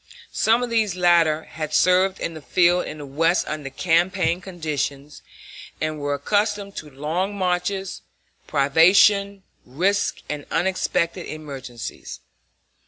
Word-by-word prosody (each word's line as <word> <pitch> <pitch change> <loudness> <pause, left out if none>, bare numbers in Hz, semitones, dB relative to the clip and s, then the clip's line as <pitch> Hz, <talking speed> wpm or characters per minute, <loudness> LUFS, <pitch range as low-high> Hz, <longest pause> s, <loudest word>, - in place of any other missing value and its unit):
Some 230 +3 +2
of 245 - -4
these 215 -5 +1
latter 170 -3 +3
had 155 -1 -5
served 185 +1 +3
in 165 - -3
the 155 - -9
field 175 +3 +2
in 155 - -7
the 145 - -8
West 165 +6 +1
under 150 -2 -4
campaign 175 +3 +1
conditions, 150 -5 -4 0.6
and 155 -1 -2
were 145 0 -1
accustomed 205 +3 -1
to 155 - -7
long 160 +9 -3
marches, 185 +1 -2 0.5
privation, 190 +7 +4 0.2
risk, 190 +10 -1
and 150 -1 -5
unexpected 180 -1 -1
emergencies. 135 - -8
170 Hz, 120 wpm, -22 LUFS, 150-190 Hz, 0.6 s, privation